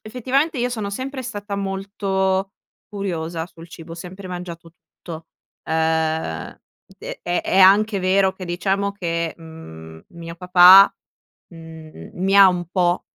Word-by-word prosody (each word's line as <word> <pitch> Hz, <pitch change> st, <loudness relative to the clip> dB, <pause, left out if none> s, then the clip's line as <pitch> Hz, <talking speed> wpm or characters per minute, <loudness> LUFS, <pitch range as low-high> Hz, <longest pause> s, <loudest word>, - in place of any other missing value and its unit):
effettivamente 260 Hz, +7 st, -1 dB
io 245 Hz, +1 st, 0 dB
sono 215 Hz, -5 st, -4 dB
sempre 260 Hz, +4 st, -5 dB
stata 205 Hz, -4 st, -6 dB
molto 195 Hz, -1 st, -2 dB, 0.4 s
curiosa 170 Hz, -5 st, -4 dB
sul 165 Hz, 0 st, -14 dB
cibo, 165 Hz, 0 st, -11 dB
ho -, -, -6 dB
sempre 185 Hz, +2 st, -10 dB
mangiato 170 Hz, -2 st, -8 dB
tutto, 165 Hz, -1 st, -12 dB, 0.4 s
uhm, 160 Hz, -, -2 dB, 0.4 s
e -, -, -8 dB
e 175 Hz, 0 st, -1 dB
è 190 Hz, -, -1 dB
anche 200 Hz, +2 st, +5 dB
vero 190 Hz, +1 st, +2 dB
che 190 Hz, -1 st, -9 dB
diciamo 195 Hz, +3 st, -2 dB
che, 170 Hz, -4 st, -3 dB
mhmm, 80 Hz, -, -12 dB
mio 170 Hz, 0 st, -10 dB
papà, 180 Hz, +2 st, +7 dB, 0.5 s
mhmm, 160 Hz, -, -12 dB
mi 195 Hz, +2 st, 0 dB
ha 200 Hz, -1 st, +9 dB
un 180 Hz, -1 st, -2 dB
po' 180 Hz, -1 st, +1 dB
185 Hz, 135 wpm, -21 LUFS, 165-200 Hz, 0.5 s, ha